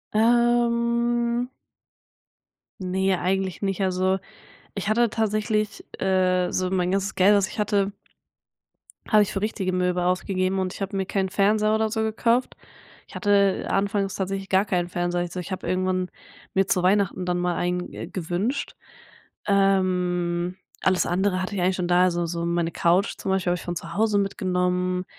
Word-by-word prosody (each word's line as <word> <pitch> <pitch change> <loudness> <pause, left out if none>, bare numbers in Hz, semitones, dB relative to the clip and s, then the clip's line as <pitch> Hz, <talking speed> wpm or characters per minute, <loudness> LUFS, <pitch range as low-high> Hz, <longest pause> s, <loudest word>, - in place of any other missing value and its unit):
Ähm 235 +1 +2 1.3
ne, 190 0 0
eigentlich 190 0 -1
nicht. 195 -1 -1
Also, 185 0 +1 0.6
ich 200 0 -3
hatte 235 +2 +3
tatsächlich, 215 -1 -1 0.2
äh 185 -1 +2
so 185 0 -1
mein 180 -1 0
ganzes 195 +1 -1
Geld, 195 +3 +5
was 200 -1 +2
ich - - -10
hatte 200 -1 +1 1.2
habe 215 -2 +6
ich 205 - -5
für 195 - -2
richtige 200 -3 -2
Möbel 180 -1 0
ausgegeben. 185 +1 0
Und 185 0 -2
ich - - -10
habe 195 0 -3
mir 190 -1 0
keinen 190 0 -1
Fernseher 215 +2 +2
oder 220 0 +1
so 220 +1 -1
gekauft. 230 +3 +1 0.5
Ich - - -15
hatte 200 -2 +2
anfangs 200 0 0
tatsächlich 195 0 -3
gar 190 +2 +3
keinen 175 -3 0
Fernseher. 175 0 -1
Also, 175 +1 -4
ich 180 +2 -7
habe 185 - -4
irgendwann 185 0 0 0.4
mir 195 0 +2
zu 180 - +2
Weihnachten 190 -1 +2
dann 180 0 0
mal 175 -1 0
einen, 180 +1 -2
äh, - - -6
gewünscht. 185 - -3 0.7
Ähm, 180 -3 +1 0.3
alles 185 -1 +2
andere 185 +1 0
hatte 185 +2 -4
ich 190 - -1
eigentlich 185 +1 +2
schon 180 -2 -1
da. 180 0 +5
Also, 175 -1 +1
so 170 0 -3
meine 170 0 0
Couch 175 +4 +2
zum 190 - -3
Beispiel 185 -2 +1
habe 175 - 0
ich - - -10
von 175 - -3
zu 165 0 -6
Hause 215 0 +2
mitgenommen. 180 -2 -1
190 Hz, 165 wpm, -24 LUFS, 180-205 Hz, 1.3 s, habe